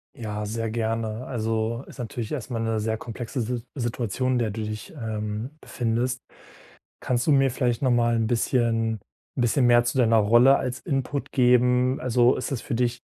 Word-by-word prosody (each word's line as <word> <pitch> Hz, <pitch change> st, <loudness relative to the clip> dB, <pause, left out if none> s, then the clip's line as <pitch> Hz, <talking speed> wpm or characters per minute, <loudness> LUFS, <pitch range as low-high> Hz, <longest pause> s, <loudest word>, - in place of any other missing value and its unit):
Ja, 105 Hz, -2 st, -4 dB
sehr 115 Hz, +1 st, -3 dB
gerne. 115 Hz, +1 st, -2 dB
Also 115 Hz, 0 st, -2 dB
ist -, -, -13 dB
natürlich 115 Hz, -1 st, -5 dB
erstmal 125 Hz, -4 st, -3 dB
'ne 115 Hz, -1 st, 0 dB
sehr 110 Hz, +1 st, -1 dB
komplexe 120 Hz, +3 st, -5 dB
Sit 120 Hz, +1 st, -3 dB
Situation, 125 Hz, 0 st, -1 dB
in 125 Hz, -, +2 dB
der 115 Hz, -2 st, 0 dB
du 110 Hz, +1 st, -4 dB
dich, 110 Hz, +7 st, -6 dB
ähm, 110 Hz, 0 st, -4 dB
befindest. 125 Hz, +2 st, -2 dB, 0.8 s
Kannst 125 Hz, +2 st, -1 dB
du 150 Hz, -, +4 dB
mir 135 Hz, -1 st, +4 dB
vielleicht 125 Hz, -2 st, 0 dB
nochmal 120 Hz, -2 st, +3 dB
'n 110 Hz, -1 st, +1 dB
bisschen 115 Hz, -2 st, +1 dB, 0.4 s
'n -, -, -1 dB
bisschen 120 Hz, +2 st, +3 dB
mehr 120 Hz, 0 st, +6 dB
zu 120 Hz, -, -2 dB
deiner 115 Hz, -3 st, +4 dB
Rolle 120 Hz, +6 st, +6 dB
als 130 Hz, 0 st, -3 dB
Input 140 Hz, -2 st, -3 dB
geben? 125 Hz, +1 st, +3 dB
Also 125 Hz, 0 st, +3 dB
ist 130 Hz, -, -4 dB
das 125 Hz, -, -2 dB
für 135 Hz, -, -4 dB
dich 120 Hz, 0 st, 0 dB
120 Hz, 180 wpm, -25 LUFS, 115-125 Hz, 0.8 s, mehr